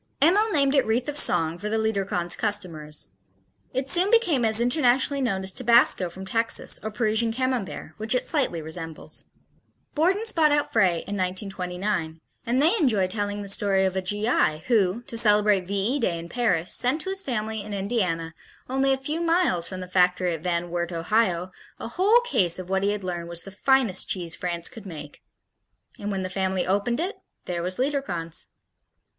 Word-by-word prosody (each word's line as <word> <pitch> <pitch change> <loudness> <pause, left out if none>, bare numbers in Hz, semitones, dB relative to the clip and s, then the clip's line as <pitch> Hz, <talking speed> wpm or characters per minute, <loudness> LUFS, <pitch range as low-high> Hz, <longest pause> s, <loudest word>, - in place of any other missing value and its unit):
Emil 395 +9 +4
named 280 -5 +2
it 275 -2 +4
"Wreath 230 +4 -1
of 295 - -3
Song" 170 - +3
for 210 +3 -4
the 220 - 0
Liederkranz 195 -5 0
customers. 165 - -2 0.6
It 260 +1 -2
soon 355 +7 +3
became 360 - +3
as 220 0 +5
internationally 260 +2 +3
known 195 -7 -1
as 190 - 0
tabasco 235 -6 +4
from 190 +3 -9
Texas 225 +4 0
or 215 - -4
Parisian 220 +1 +1
Camembert 245 -9 -3
which 220 +3 +1
it 250 - 0
slightly 250 - -1
resembles. 160 0 -6 0.7
Borden's 385 +8 +1
bought 315 -5 +3
out 290 0 0
Frey 185 -6 +2
in 205 - -5
1929 185 -2 -3 0.3
and 245 +2 +1
they 320 +8 +4
enjoy 235 - +2
telling 205 +1 -3
the - - -8
story 195 -1 +1
of 190 0 -1
a 190 - 0
G.I. 185 -5 0
who, 220 -1 +1
to 230 -1 -3
celebrate 210 -4 +3
V 200 - -3
E 220 +9 0
Day 185 -9 0
in 165 +1 -8
Paris, 185 -8 +1
sent 260 +6 +4
to 380 - -4
his 390 0 -2
family 220 - -3
in 210 +1 -9
Indiana, 190 -6 -2 0.3
only 270 +1 +1
a - - 0
few 300 +5 -3
miles 330 - +1
from 185 -1 -6
the 185 - -7
factory 180 -1 +2
at 160 - -6
Van 175 0 -2
Wert, 175 0 -2
Ohio, 180 +1 0 0.3
a - - -6
whole 410 - +3
case 190 - 0
of 185 0 -8
what 190 0 +1
he 200 - +1
had 205 -1 -4
learned 175 -2 -4
was 170 0 -2
"the 195 - -10
finest 235 -2 +1
cheese 175 -3 -2
France 170 -1 -3
could 215 -3 -9
make." 150 -4 -10 0.8
And 205 - -4
when 195 -2 -2
the - - -2
family 190 -1 -1
opened 205 +6 0
it, 370 +6 -3 0.3
there 175 -1 -3
was 185 +2 -2
Liederkranz. 255 - 0
205 Hz, 185 wpm, -25 LUFS, 180-255 Hz, 0.8 s, as